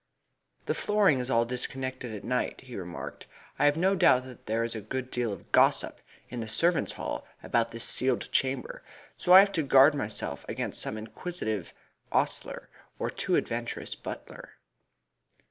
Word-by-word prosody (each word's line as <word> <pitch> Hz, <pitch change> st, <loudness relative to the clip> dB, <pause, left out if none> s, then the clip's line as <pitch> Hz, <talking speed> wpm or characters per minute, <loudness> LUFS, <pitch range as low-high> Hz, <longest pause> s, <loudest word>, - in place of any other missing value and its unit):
"This -, -, -1 dB
flooring 205 Hz, -10 st, +3 dB
is 125 Hz, 0 st, -3 dB
all 115 Hz, -2 st, +3 dB
disconnected 130 Hz, 0 st, -3 dB
at 105 Hz, -, -8 dB
night," 125 Hz, 0 st, -1 dB
he 130 Hz, -2 st, -10 dB
remarked. 90 Hz, -2 st, -7 dB, 0.3 s
"I -, -, +4 dB
have 145 Hz, +1 st, +4 dB
no 190 Hz, +3 st, +3 dB
doubt 130 Hz, -9 st, +5 dB
that 130 Hz, -2 st, -13 dB
there 115 Hz, +2 st, +1 dB
is 115 Hz, -, -2 dB
a 110 Hz, -, -5 dB
good 130 Hz, +5 st, -5 dB
deal 120 Hz, -3 st, -1 dB
of 100 Hz, -, -9 dB
gossip -, -, +3 dB, 0.3 s
in 125 Hz, -, -6 dB
the 110 Hz, -, -4 dB
servants' 165 Hz, +9 st, +1 dB
hall -, -, -4 dB, 0.2 s
about 115 Hz, -1 st, +1 dB
this 115 Hz, 0 st, -3 dB
sealed 130 Hz, -1 st, 0 dB
chamber, 130 Hz, -2 st, -1 dB, 0.3 s
so 180 Hz, -, -1 dB
I 185 Hz, +1 st, +12 dB
have 200 Hz, 0 st, +2 dB
to 165 Hz, -, 0 dB
guard 135 Hz, +1 st, +6 dB
myself 110 Hz, -7 st, -3 dB
against -, -, -1 dB
some 110 Hz, -, -3 dB
inquisitive 110 Hz, -, -4 dB, 0.4 s
ostler -, -, -1 dB, 0.3 s
or -, -, -2 dB
too -, -, -1 dB
adventurous -, -, -2 dB
butler." -, -, -9 dB
125 Hz, 165 wpm, -29 LUFS, 115-145 Hz, 0.4 s, I